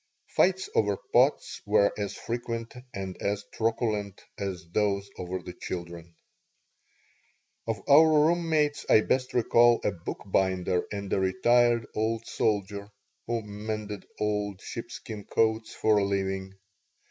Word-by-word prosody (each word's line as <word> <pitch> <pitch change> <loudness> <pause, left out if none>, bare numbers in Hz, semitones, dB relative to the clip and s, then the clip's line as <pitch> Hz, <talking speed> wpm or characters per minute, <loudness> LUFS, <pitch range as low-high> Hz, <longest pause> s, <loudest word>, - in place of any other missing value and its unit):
Fights 190 +1 +3
over 100 -2 +2 0.2
pots - - +3
were 105 0 +3
as 100 -2 -3
frequent 115 0 -4 0.2
and 95 -3 -5
as 100 0 -1
truculent 110 -3 -1 0.2
as 95 -5 -4
those 100 0 +1
over 90 +1 -3
the 90 - -7
children 85 -2 -7 1.5
Of 115 -1 -3
our 155 +3 +8 0.2
room 170 0 +1
mates 150 -2 +1
I 110 - +7
best 130 +3 -1
recall 120 0 +5
a - - +1
bookbinder 95 0 -1
and 100 -1 -4
a - - +2
retired 115 +5 +3
old 110 +1 -1
soldier 100 -2 -1 0.4
who 115 -1 -1
mended 105 0 -5
old 105 -2 -1
sheepskin 105 -2 -7
coats 110 0 +1
for 110 -1 +3
a - - +1
living. 95 -1 -2
105 Hz, 125 wpm, -28 LUFS, 95-115 Hz, 1.5 s, our